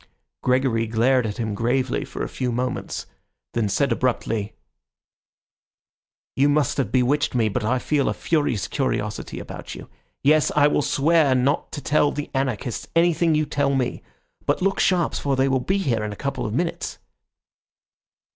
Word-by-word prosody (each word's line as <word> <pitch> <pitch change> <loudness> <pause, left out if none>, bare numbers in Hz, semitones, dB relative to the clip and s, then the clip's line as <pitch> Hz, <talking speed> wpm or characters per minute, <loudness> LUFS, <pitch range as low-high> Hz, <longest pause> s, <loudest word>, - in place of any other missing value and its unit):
Gregory 125 -3 +1
glared 120 +2 +2
at 105 - -5
him 110 -3 -2
gravely 120 +4 0
for - - -6
a - - -2
few 125 -1 -3
moments, 125 +2 -3
and - - -30 0.5
then - - -1
said 140 +6 +1
abruptly— 115 -3 -1 1.8
"You 140 +2 +3
must 145 0 +1
have 125 -7 -1
bewitched 130 +3 +1
me, 115 -3 +2
but 115 +3 -2
I 120 +4 +1
feel 140 +2 +1
a - - 0
furious 125 - 0
curiosity 110 -7 -2
about - - -8
you. - - -10 0.4
Yes, 150 +2 +4
I 145 -1 +6
will - - +2
swear 145 -1 +3
not 130 +3 +1
to 145 - -5
tell 145 0 +3
the 145 0 -5
anarchists 130 -3 -2
anything 165 -1 +3
you 155 0 +2
tell 140 -1 0
me. 130 -2 -1 0.5
But - - +2
look 195 0 +1
sharp, 180 -3 +2
for 140 -1 -1
they 135 +1 +2
will 135 -1 +2
be 190 +10 0
here 120 - 0
in 105 - -3
a - - -6
couple 140 0 -3
of 105 - -4
minutes." 170 +3 -2
130 Hz, 170 wpm, -23 LUFS, 120-145 Hz, 1.8 s, I